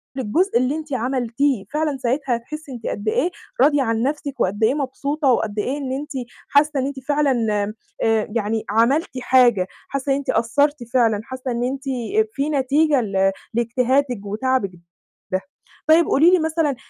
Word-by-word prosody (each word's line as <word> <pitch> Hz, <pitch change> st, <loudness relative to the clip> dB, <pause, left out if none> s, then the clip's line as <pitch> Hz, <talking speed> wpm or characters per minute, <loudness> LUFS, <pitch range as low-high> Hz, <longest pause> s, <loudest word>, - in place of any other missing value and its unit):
للجزء 270 Hz, -, +1 dB
اللي 255 Hz, +4 st, +1 dB
أنتِ 305 Hz, -3 st, -6 dB
عملتيه، 250 Hz, -1 st, 0 dB
فعلًا 300 Hz, -2 st, 0 dB
ساعتها 260 Hz, 0 st, 0 dB
هتحسي 295 Hz, +5 st, -8 dB
أنتِ 235 Hz, -3 st, -6 dB
قد 205 Hz, +2 st, -4 dB
إيه 345 Hz, +10 st, +1 dB, 0.3 s
راضية 290 Hz, 0 st, +5 dB
عن 225 Hz, 0 st, 0 dB
نفْسِك 285 Hz, 0 st, -3 dB
وقد 205 Hz, +4 st, 0 dB
إيه 220 Hz, -, +4 dB
مبسوطة 285 Hz, +1 st, -2 dB
وقد 215 Hz, -3 st, 0 dB
إيه 265 Hz, +7 st, -1 dB
إن 270 Hz, -3 st, -4 dB
أنتِ 295 Hz, +3 st, -4 dB, 0.4 s
حاسة 290 Hz, 0 st, +3 dB
إن 260 Hz, -, 0 dB
أنتِ 275 Hz, -1 st, -4 dB
فعلًا 270 Hz, -5 st, +1 dB, 0.5 s
آآ 225 Hz, -1 st, +2 dB
يعني 220 Hz, 0 st, -1 dB
عملتِ 235 Hz, +9 st, +2 dB
حاجة، 240 Hz, -7 st, +4 dB, 0.2 s
حاسة 275 Hz, 0 st, -2 dB
إن 270 Hz, -, +3 dB
أنتِ 280 Hz, -, -6 dB
أثَّرتِ 280 Hz, +4 st, +1 dB
فعلًا، 225 Hz, -4 st, +3 dB
حاسة 260 Hz, 0 st, -5 dB
إن 240 Hz, +1 st, -1 dB
أنتِ 265 Hz, +2 st, -3 dB, 0.5 s
في 280 Hz, +2 st, -1 dB
نتيجة 285 Hz, 0 st, +2 dB
ل 195 Hz, -2 st, +1 dB, 0.2 s
لاجتهادِك 245 Hz, 0 st, 0 dB
وتعبِك 215 Hz, 0 st, 0 dB, 0.6 s
ده. 185 Hz, +1 st, 0 dB, 0.5 s
طيب 325 Hz, +2 st, +6 dB
قولي 325 Hz, +6 st, +5 dB
لي 365 Hz, -, +5 dB
مثلًا، 315 Hz, -3 st, 0 dB
260 Hz, 165 wpm, -21 LUFS, 230-290 Hz, 0.6 s, طيب